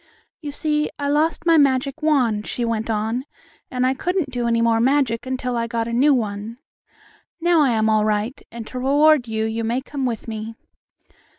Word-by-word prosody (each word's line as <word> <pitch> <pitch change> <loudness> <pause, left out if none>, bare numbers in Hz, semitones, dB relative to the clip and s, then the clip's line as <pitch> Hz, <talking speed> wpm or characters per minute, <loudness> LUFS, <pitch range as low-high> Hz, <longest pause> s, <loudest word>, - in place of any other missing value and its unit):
"You 295 - -5
see, 300 +1 -1
I 285 -1 -2
lost 315 +3 +1
my 330 -2 +5
magic 275 +2 +1
wand," 250 -9 +1
she 240 - -2
went 225 -1 -2
on, 220 +3 -1 0.5
"and 250 0 -1
I 260 - +2
couldn't 350 +1 -2
do 245 -2 -2
any 230 0 +2
more 230 -1 +2
magic 260 -2 +1
until 255 -1 -2
I 230 0 -1
got 230 -1 -2
a 235 - -4
new 275 +5 +4
one. 220 -2 -2 0.8
Now 345 -1 +3
I 280 - +4
am 220 -1 +1
all 215 -1 +3
right, 215 +4 -1
and 230 -1 -7
to 255 - -6
reward 285 0 +4
you 220 0 -1
you 225 +1 -2
may 235 +3 0
come 270 0 -4
with 230 -2 -4
me." 220 0 -6
250 Hz, 195 wpm, -21 LUFS, 225-285 Hz, 0.8 s, my